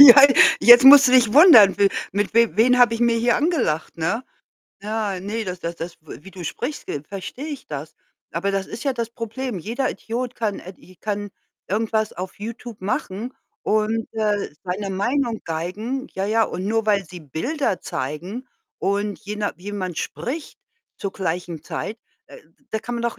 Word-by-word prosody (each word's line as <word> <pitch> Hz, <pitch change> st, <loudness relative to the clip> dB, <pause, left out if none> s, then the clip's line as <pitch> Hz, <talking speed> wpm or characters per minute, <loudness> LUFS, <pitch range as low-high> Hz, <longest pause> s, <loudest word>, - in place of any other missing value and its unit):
Ja. 275 Hz, -1 st, +11 dB, 0.4 s
Jetzt 240 Hz, +2 st, +9 dB
musst 280 Hz, 0 st, +10 dB
du -, -, +1 dB
dich 240 Hz, -4 st, +5 dB
wundern, 275 Hz, -, +8 dB
w 200 Hz, -1 st, +5 dB, 0.2 s
mit 205 Hz, +2 st, -1 dB
w 230 Hz, -2 st, +3 dB
wen 250 Hz, +3 st, +4 dB
habe 240 Hz, -2 st, +5 dB
ich 230 Hz, -, -5 dB
mir 235 Hz, -1 st, +3 dB
hier 235 Hz, +1 st, +2 dB
angelacht, 295 Hz, -, -1 dB
ne? 190 Hz, +10 st, -1 dB, 0.6 s
Ja, 210 Hz, -2 st, -2 dB
ne, 215 Hz, +4 st, -4 dB
das 180 Hz, -2 st, -6 dB
das 170 Hz, 0 st, -5 dB
das 170 Hz, +1 st, -7 dB
w 155 Hz, -, -11 dB
wie 195 Hz, -, -12 dB
du 185 Hz, -2 st, -9 dB
sprichst, 255 Hz, -, -5 dB
ve 140 Hz, -, -4 dB
verstehe 195 Hz, -, -7 dB
ich 290 Hz, -3 st, -7 dB
das. 150 Hz, +1 st, -7 dB, 0.4 s
Aber 175 Hz, +5 st, -1 dB
das 195 Hz, -1 st, -2 dB
ist 220 Hz, -, -8 dB
ja 275 Hz, -, +1 dB
das 235 Hz, -2 st, -4 dB
Problem. 230 Hz, -1 st, -5 dB
Jeder 235 Hz, -, -2 dB
Idiot 245 Hz, +2 st, -5 dB
kann 215 Hz, -3 st, -2 dB
ed 185 Hz, +1 st, -11 dB
i 185 Hz, -, -18 dB
kann 205 Hz, +1 st, -4 dB, 0.4 s
irgendwas 220 Hz, +1 st, 0 dB
auf 185 Hz, +2 st, -7 dB
YouTube 230 Hz, +1 st, -8 dB
machen 220 Hz, +2 st, -3 dB, 0.3 s
und, 215 Hz, +1 st, 0 dB
äh, 210 Hz, -2 st, -1 dB
seine 195 Hz, +2 st, -3 dB
Meinung 235 Hz, +4 st, -1 dB
geigen. 200 Hz, +11 st, -4 dB
Ja, 190 Hz, +1 st, -2 dB
ja, 225 Hz, +2 st, +2 dB
und 185 Hz, -1 st, -5 dB
nur 225 Hz, +1 st, 0 dB
weil 200 Hz, -2 st, +2 dB
sie 175 Hz, +1 st, -11 dB
Bilder 190 Hz, -, -2 dB
zeigen 175 Hz, -, -5 dB, 0.3 s
und 200 Hz, +1 st, -1 dB
je 210 Hz, +1 st, -6 dB
na 210 Hz, -1 st, -2 dB
jemand 185 Hz, -2 st, -5 dB
spricht 290 Hz, +6 st, -5 dB, 0.4 s
zur 195 Hz, -, -4 dB
gleichen 175 Hz, -4 st, -4 dB
Zeit, 225 Hz, -, -5 dB, 0.3 s
da -, -, -13 dB, 0.3 s
da 220 Hz, -, -1 dB
kann 240 Hz, +2 st, -6 dB
man 235 Hz, -, -4 dB
doch 235 Hz, -, -2 dB
215 Hz, 185 wpm, -22 LUFS, 190-240 Hz, 0.6 s, Ja